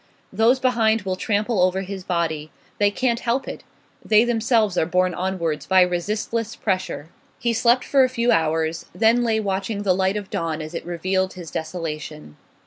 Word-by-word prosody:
Those 235 +4 +3
behind 225 -4 +2
will 190 -1 -2
trample 210 +1 0
over 185 +1 +2
his 195 0 -6
body; 160 -4 -2 0.3
they 205 0 +4
can't 235 +2 0
help 245 +3 -1
it; - - -6 0.4
they 215 +1 +5
themselves 225 -4 +1
are 160 - +1
borne 180 +1 +1
onwards 170 -5 -2
by 190 -1 +5
resistless 210 +6 -2
pressure. 185 -6 -3 0.3
He 235 -1 0
slept 235 +2 +3
for 275 -2 +4
a 255 - +2
few 240 -1 +1
hours, 160 0 0
then 230 +2 +3
lay 225 -2 +1
watching 200 0 -2
the 190 -2 +3
light 190 +2 +1
of 205 -2 -7
dawn 165 -1 -2
as 155 +1 -7
it 170 - -6
revealed 185 +2 -1
his 175 -5 -9
desolation. 155 - -6
190 Hz, 175 wpm, -22 LUFS, 170-225 Hz, 0.4 s, they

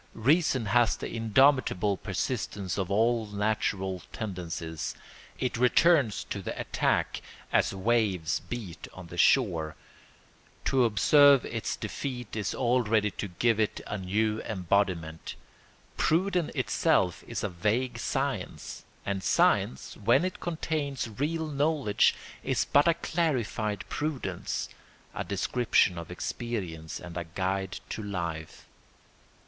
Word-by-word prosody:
Reason 135 0 +2
has 115 -1 +3
the - - -5
indomitable 115 -3 +3
persistence 100 -1 -3
of 95 -2 -2
all 115 +2 +2
natural 100 -3 -1
tendencies; 85 -6 -4 0.4
it 125 -2 -1
returns 125 - +4
to 100 - -2
the - - -5
attack - - 0 0.3
as - - +3
waves 95 -5 +1
beat 110 -9 -7
on 95 - -9
the 85 - -9
shore. 85 - +3 0.9
To 130 -2 +3
observe 140 +5 +6
its 115 -2 -3
defeat 125 +1 -5
is 105 -4 -2
already 115 -4 +2
to 100 - -5
give 110 +5 +1
it 110 - 0
a 105 - -4
new 105 +4 0
embodiment. 90 -5 -1 0.6
Prudence 180 0 +1
itself - - +1
is - - -4
a 105 - 0
vague 110 +7 -1
science, - - -3 0.2
and 100 -1 -1
science, 65 - +2
when 150 +7 +3
it 185 - -4
contains 155 -6 -2
real 160 +3 0
knowledge, 145 -6 +2 0.3
is - - +1
but 145 +3 +4
a 170 - +4
clarified 120 - -1
prudence, 150 -3 -3 0.5
a - - -3
description 100 -3 +1
of 85 - -8
experience 90 -4 -4
and 90 -1 -8
a 85 - -2
guide 95 +3 -2
to - - -4
life. 85 -6 -5
110 Hz, 120 wpm, -29 LUFS, 95-130 Hz, 0.9 s, observe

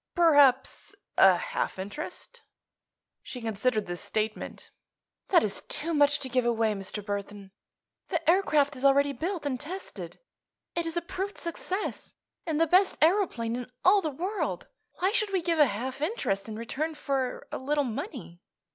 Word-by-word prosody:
"Perhaps 290 -7 +4 0.2
a - - +7
half - - -3
interest." 205 - -7 0.8
She 260 -1 -7
considered 225 0 0
this 175 0 -5
statement. 215 0 -3 0.6
"That 360 - +5
is 210 - -1
too 330 +2 -2
much 290 -1 +4
to 265 - -2
give 255 0 +1
away, 225 -2 +2
Mr. 200 +1 -5
Burthon. 200 -1 -5 0.6
The 335 -3 -2
aircraft 305 -5 +3
is 255 - -7
already 280 +1 +4
built 335 +4 -3
and 260 -3 -1
tested. 360 +7 -7 0.5
It 340 -1 -1
is 330 +1 -3
a 340 - 0
proved 385 +4 -4
success, 365 +4 -4 0.3
and 315 -2 0
the 330 - +5
best 370 +4 +3
aëroplane 315 - +2
in 250 0 -6
all 395 +2 +6
the 315 - -1
world. 365 +9 -3 0.3
Why 375 +2 +1
should 430 -3 +1
we 375 -3 0
give 330 -1 +1
a 295 - +7
half 255 +6 -4
interest 230 - -1
in 215 - -5
return 280 +8 -3
for 270 -4 -2
a - - -3
little 290 +2 +1
money?" 240 - -6
285 Hz, 160 wpm, -28 LUFS, 230-335 Hz, 0.8 s, a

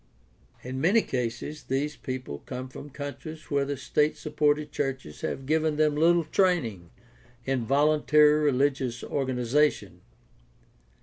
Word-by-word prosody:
In 130 +1 -5
many 205 +7 +4
cases 125 +4 -3
these 145 +3 -1
people 130 - -6
come 130 0 -5
from 145 +3 -10
countries 150 +3 -8
where 140 -1 +2
the 140 0 -3
state 150 +3 +1
supported 150 0 0
churches 135 - -4
have 135 - -4
given 155 +1 +1
them 150 -1 +2
little 170 +2 +4
training 155 - 0 0.6
in 130 -4 -1
voluntary 150 +1 +4
rehgious 130 -2 0
organization. 130 +2 0
145 Hz, 120 wpm, -27 LUFS, 130-150 Hz, 0.6 s, many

